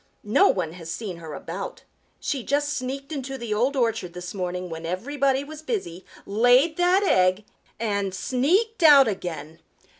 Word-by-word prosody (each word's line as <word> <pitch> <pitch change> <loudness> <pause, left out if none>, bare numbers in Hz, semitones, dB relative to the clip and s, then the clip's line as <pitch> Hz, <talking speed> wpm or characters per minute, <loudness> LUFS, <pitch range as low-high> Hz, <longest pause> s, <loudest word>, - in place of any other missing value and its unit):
No 220 - +4
one 175 -4 0
has 165 -2 -9
seen 185 0 -5
her 160 -3 -8
about. 180 +7 -7 0.4
She 275 - -2
just 290 +4 0
sneaked 275 +2 -5
into 270 -2 -4
the 235 -4 -3
Old 250 +7 +1
Orchard 225 -8 0
this 180 0 -7
morning 180 -1 -3
when 165 -1 -7
everybody 270 - 0
was 305 +1 -10
busy, 310 - -4 0.2
laid 245 +9 +4
that 360 +3 +3
egg 185 - +3 0.3
and 200 -3 -1
sneaked 335 - 0
out 290 -4 +8
again." 165 -6 -5
230 Hz, 155 wpm, -24 LUFS, 180-280 Hz, 0.4 s, out